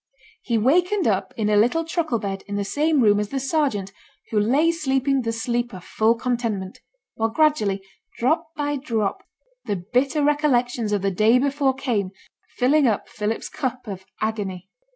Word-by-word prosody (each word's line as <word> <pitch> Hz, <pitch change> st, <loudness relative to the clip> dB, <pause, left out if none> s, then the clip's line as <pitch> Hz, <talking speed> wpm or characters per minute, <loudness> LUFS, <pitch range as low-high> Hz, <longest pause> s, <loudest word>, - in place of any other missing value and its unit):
He 235 Hz, -2 st, 0 dB
wakened 355 Hz, -, +2 dB
up 195 Hz, -3 st, 0 dB
in 215 Hz, -2 st, 0 dB
a 210 Hz, -, +3 dB
little 245 Hz, +11 st, +3 dB
truckle 320 Hz, -6 st, -1 dB
bed 195 Hz, -2 st, -4 dB
in 205 Hz, -, -4 dB
the 200 Hz, 0 st, -1 dB
same 300 Hz, +6 st, +1 dB
room 205 Hz, -2 st, +4 dB
as 210 Hz, -1 st, -2 dB
the 275 Hz, -, -2 dB
sergeant, 265 Hz, -, 0 dB, 0.4 s
who 215 Hz, -, +2 dB
lay 275 Hz, +10 st, +3 dB
sleeping 275 Hz, -4 st, 0 dB
the 230 Hz, -1 st, -2 dB
sleep 240 Hz, 0 st, -2 dB
of 180 Hz, -, -10 dB
full 220 Hz, +4 st, +2 dB
contentment; 230 Hz, -6 st, -2 dB, 0.3 s
while 225 Hz, 0 st, 0 dB
gradually, 225 Hz, -8 st, +1 dB, 0.3 s
drop 315 Hz, +6 st, +1 dB
by 290 Hz, -1 st, -1 dB
drop, 225 Hz, -7 st, -2 dB, 0.4 s
the 205 Hz, -, -1 dB
bitter 250 Hz, -, 0 dB
recollections 250 Hz, -6 st, +1 dB
of 205 Hz, -2 st, 0 dB
the 195 Hz, -, +1 dB
day 215 Hz, +6 st, +4 dB
before 275 Hz, 0 st, +1 dB
came, 235 Hz, -8 st, -1 dB, 0.5 s
filling 275 Hz, +3 st, +4 dB
up 215 Hz, -3 st, -1 dB
Philip's 215 Hz, +2 st, -3 dB
cup 255 Hz, -1 st, -4 dB
of 190 Hz, -3 st, -7 dB
agony. 200 Hz, -4 st, -3 dB
240 Hz, 170 wpm, -23 LUFS, 210-280 Hz, 0.5 s, room